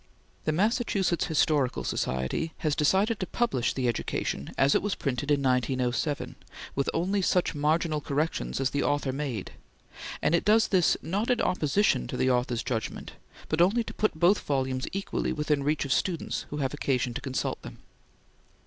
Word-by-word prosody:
The 155 - +2
Massachusetts 200 -1 +1
Historical 145 - +1
Society 65 - -2
now 155 +6 +3 0.3
publishes 185 - 0
the 130 -2 0
"Education" 105 - -2
as 135 +1 +4
it - - +3
was 205 -2 -1
printed 140 0 -2
in 145 -1 +2
1907, 130 +2 0 0.4
with 140 - 0
only 190 +4 0
such 180 -1 +1
marginal 155 +1 +1
corrections 140 - -2
as 135 - 0
the 145 - 0
author 145 -2 0
made, 135 -8 -4 0.7
and - - +1
it 170 - +3
does 220 +2 +4
this, 185 -4 +3
not 200 +7 -1
in 245 -2 +2
opposition 155 - +1
to - - -4
the 130 - +2
author's 125 -1 0
judgment, 115 -3 -4 0.4
but 155 +2 +1
only 210 +7 +4
to - - -8
put 215 - 0
both 180 +5 +5
volumes 130 -2 -1
equally 195 +1 -2
within 150 -2 0
reach 145 +1 0
of 135 - +1
students 175 -4 -1
who 150 - -5
have 135 -2 -1
occasion 130 -4 0
to - - -4
consult 130 -1 -3
them. - - -10
145 Hz, 165 wpm, -28 LUFS, 130-175 Hz, 0.7 s, both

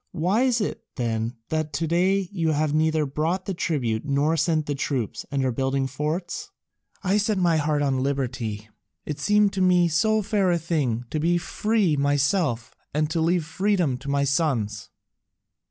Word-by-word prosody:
"Why 185 +8 +1
is 250 -3 +2
it, 205 - -3
then, 115 -1 -2
that 155 -1 -2
to 165 - -1
day 185 +4 +2
you 165 -5 0
have 150 0 0
neither 155 0 +2
brought 160 +7 -1
the 195 - -2
tribute 125 -11 -1
nor 145 +2 +1
sent 160 -1 +1
the 145 - -2
troops, 135 -5 -3
and 135 -2 0
are 130 - +1
building 135 +2 0
forts?" 165 - -3 0.5
"I 195 +2 +2
set 210 0 +1
my 175 -3 +3
heart 150 -1 +1
on 135 -2 +1
liberty: 120 -6 -2 0.4
it 150 -1 -4
seemed 210 +5 +3
to 190 - -1
me 180 -1 +4
so 215 +7 +2
fair 200 -2 +1
a 175 - +3
thing 145 -8 -1
to 155 - -1
be 170 +3 +2
free 205 -1 +1
myself 140 - +1 0.2
and 155 0 +1
to 165 - 0
leave 170 0 +1
freedom 180 -4 +1
to 140 +1 -7
my 140 0 +1
sons." 125 -8 0
155 Hz, 175 wpm, -24 LUFS, 140-180 Hz, 0.5 s, me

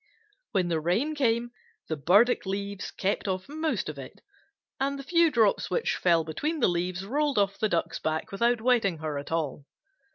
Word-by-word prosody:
When 185 -4 +1
the 165 -2 +1
rain 195 - 0
came, 240 -4 +1 0.4
the 160 - -2
burdock 200 - +3
leaves 200 0 -4
kept 200 +2 -2
off 185 -1 -2
most 300 - -2
of 150 -2 -6
it, 130 - -10 0.6
and 275 +1 0
the 275 - -7
few 335 +3 +4
drops 225 -7 +2
which 480 - 0
fell 170 -2 +3
between 300 - -3
the - - +4
leaves 180 +2 -2
rolled 285 +4 0
off 200 -1 +1
the 215 - +1
Duck's 170 -3 -1
back 160 +6 -2
without 235 +3 +1
wetting 225 -8 +2
her 155 -2 -3
at 140 - -9
all. 150 -3 -2
200 Hz, 185 wpm, -27 LUFS, 170-250 Hz, 0.6 s, few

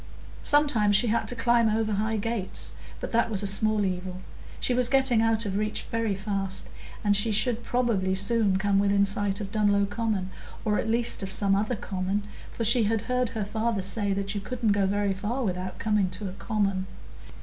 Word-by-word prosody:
Sometimes 255 -9 +3
she 230 +4 +4
had 225 0 0
to 245 - -2
climb 235 -1 +3
over 215 0 0
high 215 +2 0
gates, 215 -2 -1 0.3
but - - -5
that 230 0 +2
was 210 -2 -1
a - - -1
small 210 +1 +2
evil; 185 0 -4 0.4
she 250 - +1
was 245 0 +3
getting 265 -4 +3
out 225 0 +2
of 195 -1 -2
reach 215 0 -1
very 225 -3 0
fast, 195 -1 -2 0.3
and 205 -1 +3
she 205 +3 +2
should 225 +3 +1
probably 230 -7 0
soon 200 0 +2
come 195 0 +1
within 200 0 +3
sight 200 0 -1
of 200 -2 -6
Dunlow 205 -2 +2
Common, 205 -3 -2 0.3
or 210 -1 +1
at 225 - -2
least 235 +1 +1
of 195 -1 -4
some 195 0 +3
other 215 +5 0
common, 195 +1 -3 0.3
for 230 - -4
she 230 0 +4
had 220 0 0
heard 250 0 -1
her 220 -3 -3
father 220 -1 -1
say 200 +1 0
that 195 +1 -1
you 205 - -3
couldn't 235 +1 -1
go 200 -1 +2
very 200 0 0
far 220 +7 -3
without 185 -2 -3
coming 210 -4 +1
to 190 +3 -6
a - - -5
common. 195 -3 -1
210 Hz, 200 wpm, -26 LUFS, 195-230 Hz, 0.4 s, she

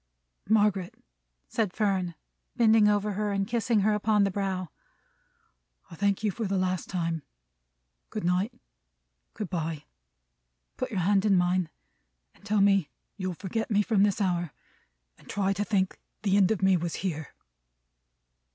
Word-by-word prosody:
"Margaret," 205 -4 +2 0.5
said 210 -5 -1
Fern, 190 -5 0 0.4
bending 225 -3 +5
over 210 0 +2
her, 210 +1 -1
and 195 -1 0
kissing 230 -1 +1
her 215 +2 +3
upon 210 0 +2
the 195 - +1
brow: 185 -2 -2 1.2
"I - - -8
thank 200 +3 0
you 210 - +2
for 225 +4 -4
the 195 0 0
last 185 -1 -1
time. 165 -3 -2 0.9
Good 215 - -4
night. 180 +6 +1 0.8
Good 210 -4 -5
bye! 160 -4 -3 0.9
Put - - -3
your 185 - -1
hand 195 +2 +3
in 205 -2 +4
mine, 180 -1 +1 0.6
and - - -25
tell 205 0 +1
me 195 -6 +4 0.3
you'll 185 -3 -3
forget 220 +5 -3
me 210 -1 +3
from 210 -2 +2
this 205 0 +3
hour, 175 -5 0 0.7
and - - -19
try 195 -1 +1
to 200 +1 -1
think 195 -3 0 0.2
the 195 -2 +2
end 200 -2 +5
of 215 -3 0
me 190 -1 +5
was 170 0 -3
here." 160 -4 -4
195 Hz, 150 wpm, -28 LUFS, 180-210 Hz, 1.2 s, bending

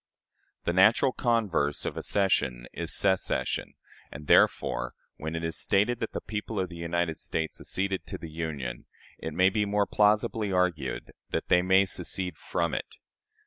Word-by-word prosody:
The 85 - +1
natural 110 +8 +5
converse 105 - 0
of - - -3
accession 65 -11 +1
is - - -4
secession; 95 -2 0 0.4
and 75 - -9
therefore, - - +3 0.2
when 80 +2 -4
it 80 - -3
is 80 -1 0
stated 110 +5 +2
that 115 - -3
the - - -3
people 105 0 -4
of 95 -1 -1
the 85 -1 -1
States 80 0 -3
acceded 95 0 -1
to - - -5
the 80 - -9
Union, 75 -7 -5 0.3
it 80 - -5
may 95 +1 +5
be 105 +2 +1
more 105 0 +1
plausibly 105 0 +2
argued 85 -8 -1 0.2
that - - -3
they 90 - +5
may 95 +2 +4
secede 90 -2 -1
from 85 -2 -1
it. - - -4
90 Hz, 155 wpm, -28 LUFS, 80-100 Hz, 0.4 s, natural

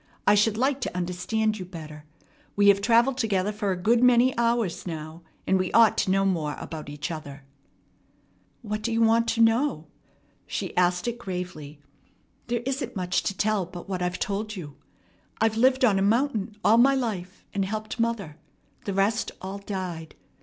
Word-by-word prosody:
"I 205 - +6
should 210 +1 +3
like 265 +3 +1
to 180 - -3
understand 205 +5 -1
you - - -4
better. 155 -4 -10 0.5
We 205 0 +5
have 200 0 +4
travelled 240 +4 +3
together 210 -4 0
for 205 -1 -2
a 185 - -1
good 230 +6 +2
many 250 +1 +5
hours 230 -7 0
now, 160 0 -6 0.2
and 190 0 +2
we 185 -1 -1
ought 230 -1 +6
to 200 - 0
know 195 +1 +2
more 160 -6 -1
about 155 -3 -7
each 145 +2 -5
other." 145 -3 -8 1.2
"What 215 -1 -3
do 230 +2 -2
you 225 - 0
want 230 +1 +3
to 230 0 +1
know?" 225 - +2 0.6
She - - -4
asked 180 +2 +2
it 240 0 -3
gravely. 180 -8 -6 0.7
"There 240 0 -2
isn't 265 -2 -3
much 180 -1 0
to 195 - -3
tell 210 -4 0
but 175 -1 -10
what 185 -2 -3
I've 180 0 -1
told 210 -1 -3
you. 150 -7 -8 0.6
I've 220 0 +2
lived 255 +3 +4
on 200 -5 +3
a - - 0
mountain 220 0 +1
all 225 +2 +6
my 270 +3 +5
life, 205 -7 -4
and 200 - 0
helped 215 +4 -4
mother. 220 -10 -2 0.5
The 200 - -3
rest 205 +3 +1
all 190 +1 -6
died. 185 -5 -6
200 Hz, 180 wpm, -26 LUFS, 180-230 Hz, 1.2 s, I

